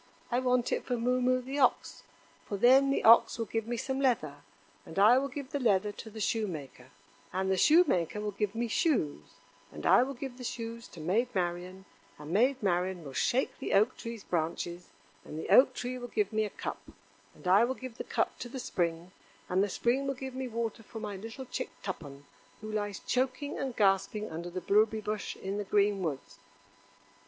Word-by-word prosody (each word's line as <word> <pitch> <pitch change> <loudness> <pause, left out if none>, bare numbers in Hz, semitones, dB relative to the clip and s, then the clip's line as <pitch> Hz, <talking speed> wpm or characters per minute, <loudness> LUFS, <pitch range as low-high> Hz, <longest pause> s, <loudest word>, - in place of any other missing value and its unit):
I 245 - +2
want 250 -1 +1
it - - 0
for 245 - -2
Moo 250 +2 +1
moo, 255 0 +2
the 270 +3 -4
ox; 255 - +2 0.5
for 200 - -3
then 265 +5 +6
the 275 - +1
ox 230 +1 +7
will 230 - -2
give 225 +1 -3
me 240 0 -2
some 265 +3 -2
leather, 220 - +1 0.5
and 160 - -11
I 220 +6 +7
will 275 - -2
give 275 -2 -7
the 285 - -1
leather 210 -4 +2
to 220 - -9
the 220 +1 -9
Shoemaker, 160 - -3 0.4
and 190 +1 -1
the - - +3
Shoemaker 210 - +4
will 210 0 -2
give 205 +1 -2
me 235 +1 -1
shoes, 225 - +1 0.5
and 75 0 -8
I - - +6
will 270 +2 -2
give 255 0 -7
the - - -7
shoes 230 0 -5
to 170 - -13
Maid 195 +10 +1
Marian, 180 +1 -3 0.3
and 150 +1 -9
Maid 250 +6 +2
Marian 180 -1 0
will 140 -2 -9
shake 255 - 0
the - - -3
Oak 215 +6 +4
tree's 230 -3 -7
branches, 170 +1 -3 0.3
and 155 - -8
the 160 - -5
Oak 255 0 +6
tree 250 +1 -4
will 245 - -6
give 210 -3 -1
me 215 0 +2
a - - -4
cup, - - -6 0.5
and - - -10
I 195 +5 +6
will 255 +2 0
give 255 -2 -9
the - - -2
cup - - -1
to 240 - -6
the 265 - -7
Spring, 170 -6 -2 0.4
and 185 +2 +3
the 205 - -1
Spring 250 +7 0
will 275 - -1
give 265 0 -6
me 260 0 -4
water 230 -1 -3
for 225 +1 -9
my 210 -2 -5
little 225 +6 -8
chick 250 - -4
Tuppen, 145 -7 -7 0.4
who 215 0 -6
lies 205 -2 -2
choking 260 +3 -2
and 265 -3 -3
gasping 205 +1 +1
under 170 +2 -5
the 185 +1 -5
blueberry 215 +3 +2
bush 210 0 -3
in 195 +2 -4
the - - -1
green 200 0 +2
woods." 155 -6 -4
215 Hz, 205 wpm, -30 LUFS, 190-250 Hz, 0.5 s, ox